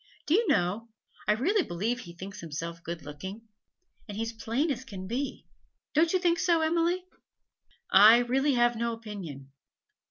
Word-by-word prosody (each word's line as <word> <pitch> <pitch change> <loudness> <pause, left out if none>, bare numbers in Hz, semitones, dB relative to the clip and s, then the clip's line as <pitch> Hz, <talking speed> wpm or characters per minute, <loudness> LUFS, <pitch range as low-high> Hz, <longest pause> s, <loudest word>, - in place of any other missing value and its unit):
Do 300 - +1
you 435 +4 +3
know, 210 - +1 0.4
I 210 - +5
really 370 - +2
believe 225 - -2
he 170 -8 -10
thinks 200 +3 -8
himself 165 0 -6
good 170 0 -6
looking? 190 +10 -8 0.6
And 205 -1 -7
he's 225 +1 -2
as 230 0 -14
plain 270 +9 0
as 250 - -2
he 260 - -13
can 190 -5 -7
be. 255 +8 -4 0.5
Don't 320 +2 +4
you 370 - +3
think 345 -2 +1
so, 340 -3 +3
Emily?' 340 +3 +1 0.9
'I 210 +4 +9
really 270 +4 +1
have 240 -1 +3
no 235 +1 -1
opinion.' 185 -12 -8
230 Hz, 170 wpm, -29 LUFS, 190-295 Hz, 0.9 s, I